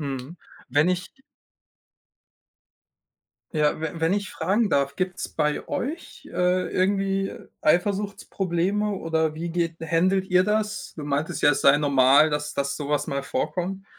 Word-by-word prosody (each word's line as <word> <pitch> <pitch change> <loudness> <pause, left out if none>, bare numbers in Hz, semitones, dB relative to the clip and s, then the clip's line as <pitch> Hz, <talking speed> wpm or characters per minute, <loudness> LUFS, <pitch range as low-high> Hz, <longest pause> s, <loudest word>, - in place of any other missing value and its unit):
Mhm. 135 +2 -5 0.3
Wenn 145 +5 +3
ich 180 0 -2 2.4
ja, 150 -2 +2
we-wenn 160 +2 -1
ich 205 -1 -1
fragen 210 +3 0
darf, 140 0 +1
gibt's 185 0 -3
bei 150 -1 -1
euch, 320 +2 -5
äh, 180 +1 +1
irgendwie 195 +1 0 0.3
Eifersuchtsprobleme 195 +2 0
oder 160 -4 -1
wie 170 +2 -4
geht 170 -1 -1
händelt 185 +4 +1
ihr 185 0 +4
das? 210 +1 -2
Du 155 - -6
meintest 145 +2 -2
ja, 145 - +6
es 140 - 0
sei 140 +1 +6
normal, 140 +1 +5
dass 150 0 -3
dass 140 0 -1
so 145 -2 -5
was 150 -1 0
mal 140 0 -2
vorkommt. 195 - -3
170 Hz, 135 wpm, -25 LUFS, 150-195 Hz, 2.4 s, ja